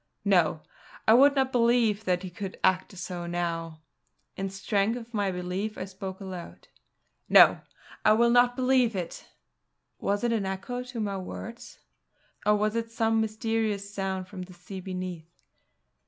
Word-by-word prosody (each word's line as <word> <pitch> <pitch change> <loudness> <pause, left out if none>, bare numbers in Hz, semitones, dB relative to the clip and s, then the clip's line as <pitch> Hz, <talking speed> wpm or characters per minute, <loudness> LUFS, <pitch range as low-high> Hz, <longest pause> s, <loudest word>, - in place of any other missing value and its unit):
No! 175 -5 +3 0.4
I 220 - +8
would 280 +4 +6
not 265 -1 +2
believe 235 -3 +3
that 180 0 +1
he 185 - -6
could 190 +2 -7
act 185 +1 +1
so 175 -1 -5
now. 165 -2 -3 0.5
In 195 0 -3
strength 200 +3 0
of 235 0 -10
my 205 -3 0
belief 180 +4 -3
I 185 - -4
spoke 190 0 -7
aloud: 185 -3 -9 0.6
"No! - - +7 0.4
I 215 - +6
will 235 +2 +4
not 245 0 +5
believe 255 -3 +3
it!" 175 -3 -5 0.7
Was 205 +2 -1
it 235 -1 +2
an 205 -4 0
echo 200 +6 -4
to 250 -1 -7
my 200 -2 -2
words? 230 +5 -8 0.7
or 210 - +6
was 210 +1 0
it 230 0 -2
some 225 -1 +1
mysterious 215 -2 -1
sound 190 -2 -3
from 185 -1 -8
the 180 0 -9
sea 180 +2 -9
beneath? 180 -3 -7
200 Hz, 155 wpm, -28 LUFS, 185-230 Hz, 0.7 s, I